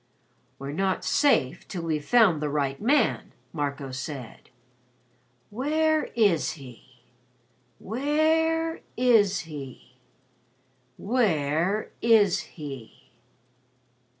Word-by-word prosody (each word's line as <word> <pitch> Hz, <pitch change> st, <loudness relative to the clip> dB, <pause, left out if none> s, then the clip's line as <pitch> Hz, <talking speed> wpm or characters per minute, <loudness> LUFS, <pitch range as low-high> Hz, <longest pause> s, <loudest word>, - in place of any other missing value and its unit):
"We're 135 Hz, +1 st, -6 dB
not 190 Hz, +5 st, -1 dB
safe 275 Hz, -, +2 dB
till 175 Hz, -3 st, -5 dB
we've 155 Hz, -3 st, -2 dB
found 200 Hz, -7 st, +4 dB
the 150 Hz, -, -1 dB
right 140 Hz, -2 st, -2 dB
man," 250 Hz, +2 st, +1 dB, 0.2 s
Marco 140 Hz, -3 st, -3 dB
said. 130 Hz, -1 st, -7 dB, 1.0 s
"Where 310 Hz, +6 st, +1 dB
is 205 Hz, -9 st, +2 dB
he? 125 Hz, -3 st, -14 dB, 0.8 s
Where 320 Hz, -, 0 dB, 0.2 s
is 215 Hz, -7 st, +3 dB
he? 135 Hz, -5 st, -10 dB, 1.0 s
Where 190 Hz, -, 0 dB
is 220 Hz, -5 st, +4 dB
he?" 130 Hz, -4 st, -10 dB
180 Hz, 85 wpm, -26 LUFS, -, 1.0 s, found